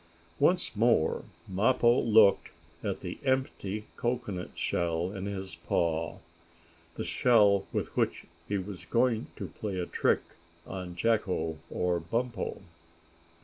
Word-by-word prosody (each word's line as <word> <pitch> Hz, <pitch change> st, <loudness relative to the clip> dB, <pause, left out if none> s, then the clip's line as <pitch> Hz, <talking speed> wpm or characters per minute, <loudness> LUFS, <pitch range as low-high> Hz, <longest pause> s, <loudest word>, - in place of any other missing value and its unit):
Once 180 Hz, -9 st, +3 dB
more 115 Hz, -7 st, +2 dB, 0.2 s
Mappo 120 Hz, +5 st, +3 dB
looked 110 Hz, -3 st, +5 dB, 0.3 s
at -, -, -2 dB
the -, -, -6 dB
empty 130 Hz, -6 st, -1 dB
cocoanut 120 Hz, -7 st, -3 dB
shell 85 Hz, +1 st, 0 dB
in 100 Hz, -1 st, -5 dB
his 95 Hz, -1 st, -5 dB
paw 80 Hz, -1 st, -1 dB, 0.8 s
the -, -, -3 dB
shell 105 Hz, -5 st, +4 dB
with -, -, -3 dB
which -, -, 0 dB, 0.2 s
he 100 Hz, -, 0 dB
was 95 Hz, -1 st, -6 dB
going 120 Hz, -1 st, +1 dB
to 100 Hz, -, -5 dB
play 100 Hz, +4 st, -5 dB
a 90 Hz, -, -1 dB
trick -, -, +2 dB, 0.4 s
on 90 Hz, -2 st, -6 dB
Jacko 90 Hz, -6 st, 0 dB
or 90 Hz, -1 st, 0 dB
Bumpo. 115 Hz, +6 st, -3 dB
100 Hz, 120 wpm, -30 LUFS, 90-115 Hz, 0.8 s, looked